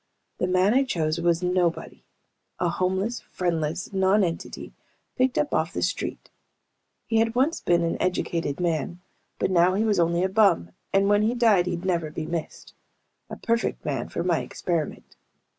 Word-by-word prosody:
The 180 - +1
man 185 +3 +3
I 270 +2 +4
chose 165 -9 -1
was 170 0 +1
a - - +1
nobody. 180 -2 -1 0.5
A 175 - 0
homeless, 190 +7 -1
friendless 170 0 -2
non 190 +2 +3
entity, 170 -2 -4 0.4
picked 255 0 +1
up 295 - 0
off 160 +4 0
the - - -2
street. 180 - -3 0.7
He 225 -1 +1
had 225 +1 +1
once 280 +7 +1
been 170 -1 +2
an 165 - -1
educated 170 -4 -1
man. 170 0 -1 0.4
But - - 0
now 180 +1 +4
he 210 - +1
was 210 -4 +2
only 170 +1 +2
a - - +3
bum, 190 - +3 0.2
and 195 0 +3
when 205 0 +4
he 225 +3 +1
died 215 -7 +4
he'd 175 0 -3
never 170 -4 0
be 155 +1 -5
missed. 165 -1 -5 0.6
A - - -6
perfect 230 0 -1
man - - -2
for - - -3
my - - +2
experiment. 165 -4 -4
180 Hz, 175 wpm, -25 LUFS, 170-205 Hz, 0.7 s, I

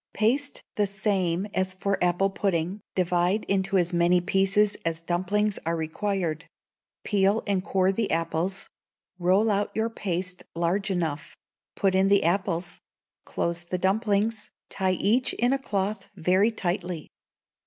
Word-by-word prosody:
Paste 270 +7 +1
the 205 -1 +2
same 195 -2 0
as 185 0 0
for 195 0 -1
apple 180 +3 +2
pudding, 190 0 -1
divide 180 +3 +1
into 195 0 0
as 175 0 +1
many 175 +1 +4
pieces 195 +3 +2
as 165 0 -2
dumplings 190 +4 0
are 165 +1 -1
required; 165 0 -2 0.6
peel 200 +1 +2
and 195 -3 0
core 190 -1 +2
the 210 +2 -1
apples; 165 +4 -1 0.5
roll 190 +5 +3
out 205 0 0
your 225 +1 0
paste 185 -3 -3
large 180 +4 0
enough; 160 -6 -3 0.4
put 195 -1 +1
in 190 +1 +3
the 200 0 +4
apples; 175 0 -1 0.5
close 170 0 -2
the 180 +1 -3
dumplings, 210 +3 0 0.2
tie 190 -1 0
each 220 +8 +1
in 245 +2 +2
a 275 - 0
cloth 200 -4 -2
very 185 +4 +3
tightly. 180 -5 -3
190 Hz, 140 wpm, -26 LUFS, 175-205 Hz, 0.6 s, many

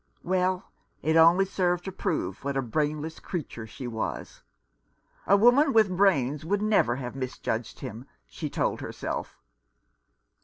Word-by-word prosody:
Well, 185 0 0 0.3
it 160 +1 +2
only 165 +4 +6
served 180 -2 0
to 190 - -4
prove 180 - -3
what 140 0 -2
a 135 - 0
brainless 150 +5 -2
creature 135 - -6
she 125 +4 -8
was. 110 -2 -5 0.9
"A 200 - +6
woman 255 +7 +5
with 215 -5 +4
brains 150 -8 +2
would 200 +5 0
never 205 - +3
have 125 -1 -6
mis 130 -1 -4
judged 110 0 -3
him," 115 +5 -7 0.2
she - - -6
told - - -1
herself. - - -5
165 Hz, 145 wpm, -27 LUFS, 130-195 Hz, 0.9 s, only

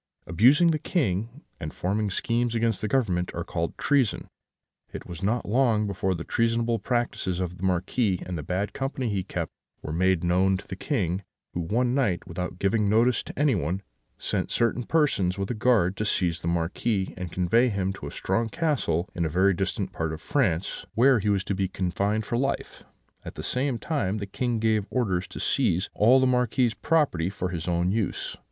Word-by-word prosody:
"Abusing 130 - +5
the 155 - 0
King, 120 - -1 0.2
and 75 -4 -5
forming 100 +3 -1
schemes 120 +4 0
against 115 -2 +1
the 110 - -1
Government, 95 -8 0
are 85 - -2
called 85 0 -3
treason. 135 -7 +1 0.6
It - - -7
was 85 0 -8
not 110 +5 0
long 110 -1 +2
before 95 -1 -1
the 85 - -5
treasonable 115 +1 +1
practices 120 -6 -1
of 90 -1 -3
the 95 - -10
Marquis, 95 +2 +1
and 90 - -4
the 80 - -3
bad 90 +7 -2
company 135 -2 -2
he 100 -2 0
kept, - - -4 0.3
were 75 - -4
made 95 +1 +2
known 95 +2 +3
to - - -11
the 95 - -5
King, 95 - -1 0.3
who, - - -3
one 120 +9 +1
night, 110 -10 +1
without 90 +1 -4
giving 100 +2 +1
notice 115 +2 +3
to - - -10
anyone, 100 - +1 0.3
sent - - -2
certain 120 +1 +1
persons 100 - +2
with 100 +2 -2
a - - 0
guard 110 -5 +2
to 105 - -1
seize 85 -5 0
the - - -4
Marquis, 90 +4 -1
and 90 -2 -6
convey 115 +9 +3
him 95 -2 -1
to - - -8
a - - -7
strong 115 +4 -1
castle 125 - 0
in 85 - -1
a 80 - 0
very 95 +5 +3
distant 95 +1 -2
part 80 -1 -2
of 80 - -6
France, 95 - 0
where 130 +1 +5
he 105 +1 0
was 100 -2 +2
to 100 - -2
be 95 0 0
confined 100 +4 -1
for 120 - -1
life; 135 +1 -2 0.4
at - - -8
the - - -6
same 130 -1 -1
time 110 - -1
the 100 - -4
King 120 +4 -2
gave 110 -2 +1
orders 95 -8 0
to - - -9
seize 90 +3 +1
all 120 +5 +5
the 130 - +3
Marquis's 125 -1 +2
property 135 - +1
for 95 -2 -3
his 85 -2 -5
own 90 +1 +1
use. 105 -2 -2
100 Hz, 195 wpm, -26 LUFS, 90-120 Hz, 0.6 s, Abusing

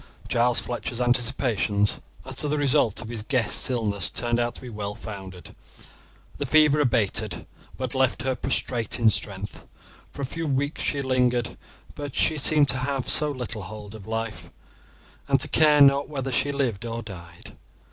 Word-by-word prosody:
Giles 120 0 +2
Fletcher's 120 0 -4
anticipations 120 -4 +1 0.3
as 130 - -7
to 150 - 0
the 150 +1 0
result 140 -6 +2
of 110 - -9
his 115 -2 -5
guest's 120 0 +1
illness 105 -6 +1
turned 120 0 0
out 120 0 -1
to - - -9
be 125 - -9
well 105 -2 -5
founded. 95 -4 -9 0.8
The 145 - -2
fever 150 +1 +5
abated, 115 -8 0 0.3
but 130 -2 -3
left 130 -2 +1
her 130 0 +1
prostrate 125 -2 0
in 115 -2 +4
strength. 100 0 -4 0.4
For 140 - -6
a - - +1
few 165 +4 -4
weeks 145 +2 -1
she 140 -1 0
lingered; 125 -2 +1 0.4
but 145 -2 -7
she 155 -1 +2
seemed 145 0 +3
to - - 0
have 135 0 -2 0.2
little 130 -7 -3
hold 105 +2 -9
of 110 -2 -11
life, 115 -1 -4 0.8
and - - +3
to - - 0
care 150 -2 +5
not 140 0 +5
whether 135 -3 -3
she 135 +3 +1
lived 125 -7 -1
or 115 0 -4
died. 85 -5 -11
125 Hz, 165 wpm, -25 LUFS, 110-140 Hz, 0.8 s, fever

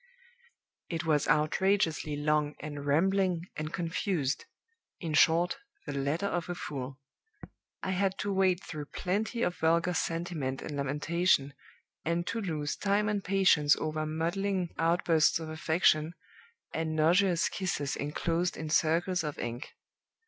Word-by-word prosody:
"It 165 -1 -3
was 150 -3 +2
outrageously 155 +1 +2
long, 150 0 +1
and 145 -1 -6
rambling, 180 +3 +2
and 155 0 -4
confused; 165 -4 -1 0.5
in 165 -4 -4
short, 170 +3 +4 0.3
the - - -4
letter 140 +7 -1
of 175 -3 -2
a 175 - -2
fool. 135 -4 -6 0.8
I 190 - -1
had 190 +1 0
to 205 -1 -2
wade 190 -1 +2
through 150 -3 -6
plenty 215 +8 -2
of 180 - -1
vulgar 170 +2 +2
sentiment 165 -6 -2
and 150 - -5
lamentation, 145 +1 +1 0.5
and 170 +1 0
to 230 - -2
lose 155 -6 -2
time 205 +1 +1
and 205 -2 -1
patience 180 -6 +4
over 155 0 -2
maudlin 175 +3 -1
outbursts 165 -1 +3
of 160 -1 -6
affection, 160 0 +2 0.6
and 160 -1 -2
nauseous 170 +2 +3
kisses 160 -7 -2
inclosed 165 +4 -1
in 155 -1 -5
circles 170 +3 +2
of 150 -2 -4
ink. 120 +3 -5
165 Hz, 135 wpm, -30 LUFS, 150-180 Hz, 0.8 s, short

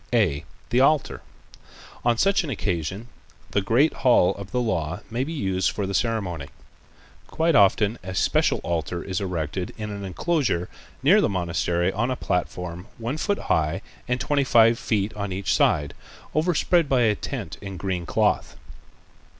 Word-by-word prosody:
(a) 95 -12 +2 0.3
The 120 - +3
Altar.—On 135 -4 -2
such 195 +7 +3
an 160 - -5
occasion 95 - -3 0.4
the 100 - +2
great 125 +10 +3
hall 120 -8 +4
of 100 -1 -9
the 125 - 0
Law 90 -8 -1
may 120 +3 0
be 150 - -5
used 95 - 0
for 100 - -3
the 100 - -4
ceremony. 95 - -1 0.8
Quite 165 +1 +1
often 105 +1 +4
a 95 0 -6
special - - +2
altar 85 0 -2
is 95 +1 -3
erected 90 -1 -3
in 105 -1 -5
an 100 -1 -6
enclosure 100 - -1 0.3
near - - +6
the - - +2
monastery 85 -1 0
on 115 +5 0
a 130 - 0
platform 90 -2 -3
one 120 +6 -3
foot 200 +5 0
high 75 -1 0 0.2
and 125 +1 0
twenty 145 +1 +1
five 115 -3 +5
feet 105 -1 -1
on 100 -2 -4
each 95 +1 -1
side, 75 -1 +2 0.4
overspread 170 0 +2
by 130 -2 +3
a 110 -3 +4
tent 105 - -6
of 100 -2 -7
green 90 -2 -3
cloth. - - +1
100 Hz, 160 wpm, -24 LUFS, 90-125 Hz, 0.8 s, near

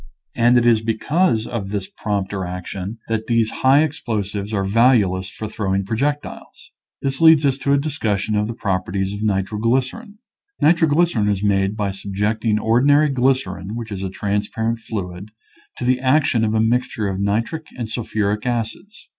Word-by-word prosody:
And 120 +1 +4
it 120 - +3
is 115 -2 +4
because 115 +3 +1
of 105 -5 -4
this 100 -2 -3
prompter 100 -2 -3
action 90 +3 -6
that 110 -1 -2
these 115 -2 +2
high 135 +3 +5
explosives 105 -9 -3
are 100 -3 0
valueless 100 -3 +3
for 110 - -6
throwing 100 -2 -2
projectiles. 140 +8 -4 0.3
This 135 +1 -2
leads 160 -2 +7
us 135 -1 +1
to 140 +2 +1
a - - +4
discussion 110 -8 -1
of 105 0 +1
the 115 - -5
properties 95 -2 -2
of 100 - -6
nitroglycerin. 115 - -1 0.4
Nitroglycerin 160 -8 +3
is 100 -1 -1
made 100 0 +1
by 100 -2 -1
subjecting 105 +3 -1
or 115 +3 +2
dinary 145 +1 +4
glycerin, 125 -7 0
which 115 -2 -6
is 95 -2 -4
a 95 - -3
transparent 105 +4 -2
fluid, 100 -3 -6 0.5
to 125 - -4
the 125 0 +2
action 130 -3 +2
of 110 0 +1
a - - +2
mixture 115 -1 0
of 95 -1 -3
nitric 115 +11 -1
and 120 -3 -3
sul 115 +2 -4
phuric 105 +1 -1
acids. 120 - -4
110 Hz, 165 wpm, -20 LUFS, 100-130 Hz, 0.5 s, leads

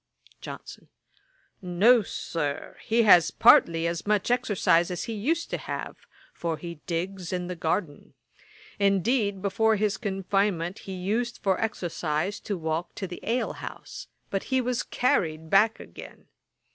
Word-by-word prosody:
JOHNSON. - - -10 0.7
'No, 200 +7 +4
Sir; 150 -6 -4
he 230 +1 +2
has 180 -6 +7
partly 165 0 +5
as 170 +3 -3
much 210 +2 +1
exercise 205 -8 +2
as 180 -2 -3
he 230 - -4
used 305 +11 -1
to - - -2
have, - - -5 0.4
for 165 -2 -3
he 170 -2 -8
digs 180 +1 -3
in 180 -1 -2
the 180 0 -5
garden. 160 -2 -3 0.6
Indeed, 200 0 +1
before 220 +3 +2
his 210 0 0
confinement, 195 -3 -1
he - - -4
used 220 +6 -2
for 190 -2 +1
exercise 180 -3 -2
to 200 - -4
walk 160 +1 -3
to 195 - -4
the 180 -1 -7
ale 240 +3 -1
house; - - -9 0.2
but 195 - -2
he 260 -1 +1
was 250 -1 -1
carried 160 -10 0
back 215 +3 +4
again. - - -12
195 Hz, 145 wpm, -27 LUFS, 170-215 Hz, 0.7 s, has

